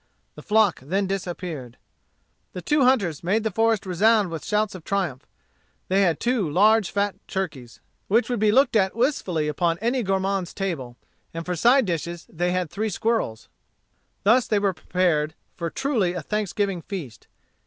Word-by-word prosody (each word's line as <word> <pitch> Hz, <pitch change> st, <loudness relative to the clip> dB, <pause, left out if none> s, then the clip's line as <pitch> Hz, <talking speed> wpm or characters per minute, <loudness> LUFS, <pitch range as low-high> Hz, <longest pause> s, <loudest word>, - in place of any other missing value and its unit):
The -, -, -11 dB
flock 210 Hz, -4 st, +3 dB
then 190 Hz, +10 st, -1 dB
disappeared. 175 Hz, -9 st, -5 dB, 0.8 s
The 180 Hz, -, -6 dB
two 295 Hz, -, +2 dB
hunters 195 Hz, -, +2 dB
made 205 Hz, +6 st, +1 dB
the 220 Hz, -, -1 dB
forest 225 Hz, 0 st, +1 dB
resound 200 Hz, +1 st, +3 dB
with 165 Hz, -, -5 dB
shouts 210 Hz, -1 st, 0 dB
of 185 Hz, -4 st, -9 dB
triumph. 180 Hz, -10 st, -2 dB, 0.6 s
They 195 Hz, +2 st, +3 dB
had 170 Hz, -5 st, +2 dB
two 240 Hz, -9 st, 0 dB
large, 210 Hz, +5 st, +4 dB
fat 200 Hz, 0 st, -1 dB
turkeys, 150 Hz, -11 st, -5 dB, 0.3 s
which 230 Hz, +5 st, +3 dB
would 245 Hz, -3 st, -1 dB
be 210 Hz, 0 st, +3 dB
looked 265 Hz, +2 st, +3 dB
at 190 Hz, -2 st, +2 dB
wistfully 195 Hz, -, 0 dB
upon 165 Hz, +3 st, 0 dB
any 240 Hz, +5 st, 0 dB
gourmand's 195 Hz, -2 st, -1 dB
table, 150 Hz, -12 st, -4 dB, 0.4 s
and 165 Hz, 0 st, -4 dB
for 180 Hz, -, -2 dB
side 245 Hz, -, +4 dB
dishes 170 Hz, -1 st, -3 dB
they 175 Hz, +2 st, 0 dB
had 180 Hz, -3 st, -1 dB
three 215 Hz, +2 st, -2 dB
squirrels. 210 Hz, -, -1 dB, 0.8 s
Thus 230 Hz, +5 st, +4 dB
they 215 Hz, -, +2 dB
were 200 Hz, -1 st, +1 dB
prepared 165 Hz, -4 st, 0 dB, 0.2 s
for 170 Hz, -1 st, -3 dB
truly 225 Hz, -, 0 dB
a 175 Hz, -3 st, -5 dB
thanksgiving 200 Hz, -1 st, -1 dB
feast. 155 Hz, -, -8 dB
190 Hz, 165 wpm, -24 LUFS, 170-215 Hz, 0.8 s, large